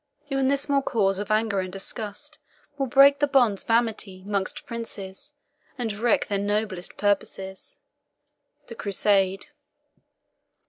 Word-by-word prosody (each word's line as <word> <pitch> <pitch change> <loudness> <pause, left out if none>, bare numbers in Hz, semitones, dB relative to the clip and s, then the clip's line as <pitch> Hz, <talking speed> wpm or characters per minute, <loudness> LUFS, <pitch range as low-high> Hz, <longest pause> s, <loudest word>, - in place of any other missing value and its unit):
Even 270 -1 +2
this 280 +1 +2
small 280 -1 +2
cause 195 -7 +1
of 205 - -4
anger 215 -2 +2
and 185 -1 -3
disgust 215 +9 -4 0.4
Will 275 -2 -1
break 275 +3 +7
the 290 - +3
bonds 245 -8 +3
of - - -23
amity 220 -5 0
'mongst 200 -2 -2
princes, 205 -5 -5 0.4
And 230 -4 -2
wreck 225 +2 +2
their 200 -1 0
noblest 205 -2 -2
purposes. 200 - -1 0.9
THE - - -9
CRUSADE. 195 -2 +1
210 Hz, 130 wpm, -25 LUFS, 195-245 Hz, 0.9 s, break